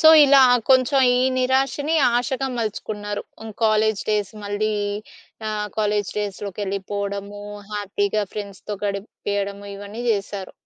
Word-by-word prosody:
So, 315 - +8 0.2
ఇలా 275 0 +7 0.3
కొంచెం 260 +1 +5 0.2
ఈ - - +3 0.2
నిరాశని 270 +4 +1 0.2
ఆశగా 265 +2 -1
మలుచుకున్నారు. 210 -2 -3 0.2
హ్మ్. 220 0 -7
కాలేజ్ 215 -1 +3
డేస్ 205 -2 0
మళ్ళీ 205 +1 -1 0.8
ఆహ్, 210 -1 -2
కాలేజ్ 210 -1 +1
డేస్‌లోకెళ్ళిపోవడము, 200 0 -4 0.3
హ్యాపీగా 205 0 0
ఫ్రెండ్స్‌తో 205 0 -5
గడిపియడము 200 0 -3
ఇవన్నీ 205 +4 -7
చేశారు. 200 -2 -2
205 Hz, 105 wpm, -23 LUFS, 200-220 Hz, 0.8 s, So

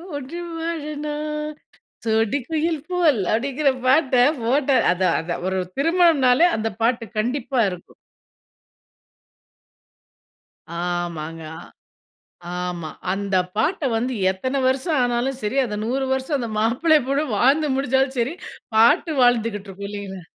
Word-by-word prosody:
ஒன்றி 285 +5 -6 0.2
வாழனும், 300 -1 -4 0.6
சோடி 225 +2 +2
குயில் 320 -1 0
போல்" 320 - +3
அப்படிங்கிற 275 +4 +1
பாட்ட 260 -2 +4 0.2
போட்ட 270 +4 +1 0.2
அதான் 180 -1 +1
அதான். 175 +1 -4
ஒரு 190 - -1 0.2
திருமணம்னாலே 325 -2 +4
அந்த 225 +1 -1
பாட்டு 230 0 +1
கண்டிப்பா 250 +2 -1
இருக்கும். 180 -1 -10 2.9
ஆமாங்க. 170 -2 -3
அ - - -15 0.8
ஆமா. 170 -3 -5 0.2
அந்த 195 -1 -1 0.2
பாட்ட 310 - 0
வந்து 250 +3 -1 0.2
எத்தன 260 +8 -2
வருஷம் 270 +4 +1
ஆனாலும் 245 +2 -1
சரி, 210 +5 -2
அதை 210 -4 -4
100 260 +4 -1
வருஷம் 265 +2 -1
அந்த 235 - -3
மாப்பிள்ளை, 255 +9 +3
பொண்ணும் 275 -3 0
வாழ்ந்து 290 +5 +3
முடிச்சாலும் 265 0 +1
சரி, 250 +7 -1 0.4
பாட்டு 295 +9 +4
வாழ்ந்துகிட்ருக்கும் 205 -5 0
இல்லைங்களா? 195 -4 -7
255 Hz, 110 wpm, -22 LUFS, 215-295 Hz, 2.9 s, பாட்ட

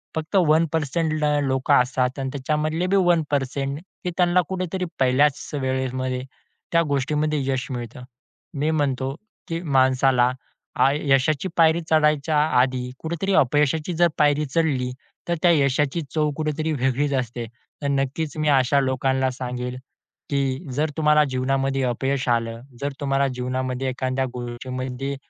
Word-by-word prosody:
फक्त 160 +5 -4
1% 160 -1 +2
ल 155 -1 0 0.2
लोकं 130 0 +1
असतात 125 +1 -1
आणि 135 0 -2
त्याच्यामधले 155 +5 -1
बी 195 - +2
1% 145 -6 +1 0.2
की 180 - -1
त्यांना 180 0 +4
कुठेतरी 185 0 -2
पहिल्याच 135 +2 +2
वेळेमध्ये, 130 -1 -2 0.5
त्या 170 - +4
गोष्टीमध्ये 150 +2 0
यश 130 -1 -1
मिळतं. 120 0 -6 0.5
मी 145 +2 -1
म्हणतो 135 -3 0 0.3
की 165 +1 -3 0.2
माणसाला 130 -1 +4 0.5
आय 140 +2 +3
यशाची 140 +5 +2
पायरी 165 0 +4
चढायच्या 150 -1 +3 0.2
आधी, 125 -1 +1
कुठेतरी 170 +4 -2
अपयशाची 150 +5 0
जर 175 +1 +4
पायरी 150 0 +3
चढली, 135 -4 0 0.4
तर 170 - +1
त्या 175 - +5
यशाची 145 +1 +1
चव 155 -1 +2
कुठेतरी 155 +1 -1
वेगळीच 135 +1 0
असते. 120 -1 -4 0.4
तर 145 - -1
नक्कीच 140 +3 -1
मी 155 0 0
अशा 135 0 +4
लोकांना 130 0 +1
सांगेन, 125 -1 -5 0.5
की 140 +2 -1
जर 150 +4 0
तुम्हाला 150 -1 +4
जीवनामध्ये 135 +1 0
अपयश 135 +2 -1
आलं, 115 -1 0 0.2
जर 140 +1 -1
तुम्हाला 140 -1 +1
जीवनामध्ये 130 +1 -2
एखाद्या 130 +1 -1
गोष्टीमध्ये 130 +2 -5
140 Hz, 135 wpm, -23 LUFS, 130-155 Hz, 0.5 s, त्या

